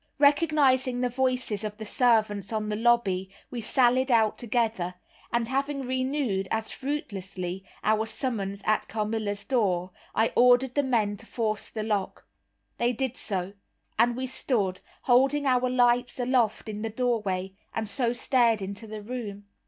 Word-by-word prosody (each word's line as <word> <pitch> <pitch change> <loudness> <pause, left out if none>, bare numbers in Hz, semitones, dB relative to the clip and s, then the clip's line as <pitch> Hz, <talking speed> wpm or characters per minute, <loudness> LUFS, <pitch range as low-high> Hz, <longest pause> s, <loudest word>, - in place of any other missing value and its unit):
Recognizing 285 -4 +3
the 250 - +1
voices 250 -4 -1
of 210 -1 -4
the 220 - -7
servants 215 -4 +2
on 215 -1 -2
the 210 - -1
lobby, 210 -5 +2 0.2
we 240 - -4
sallied 255 +3 +3
out 225 -3 +4
together; 220 -6 -1 0.4
and 235 -1 +1
having 275 +2 -1
renewed, 255 -6 -1
as 220 0 -2
fruitlessly, 195 -9 -4 0.2
our 215 +1 +2
summons 205 -6 -3
at 215 - +1
Carmilla's 215 -2 -2
door, 185 -8 +1 0.2
I 225 - +2
ordered 250 +1 +5
the 285 - +3
men 220 -6 +1
to 225 - -14
force 215 -3 -2
the 215 - -4
lock. 210 -3 -2 0.5
They 240 +1 +2
did 260 +1 -2
so, 190 -4 -3 0.5
and 240 +1 +4
we 260 - -2
stood, 225 -7 -1 0.2
holding 270 +3 +3
our 255 -1 +3
lights 245 0 +2
aloft, 245 -3 +1
in 210 -1 -5
the 225 - -2
doorway, 210 -6 -1 0.2
and 220 -1 -3
so 235 +1 0
stared 240 -3 +2
into 200 +3 -6
the 215 -1 -7
room. 205 -4 -6
230 Hz, 150 wpm, -27 LUFS, 210-255 Hz, 0.5 s, ordered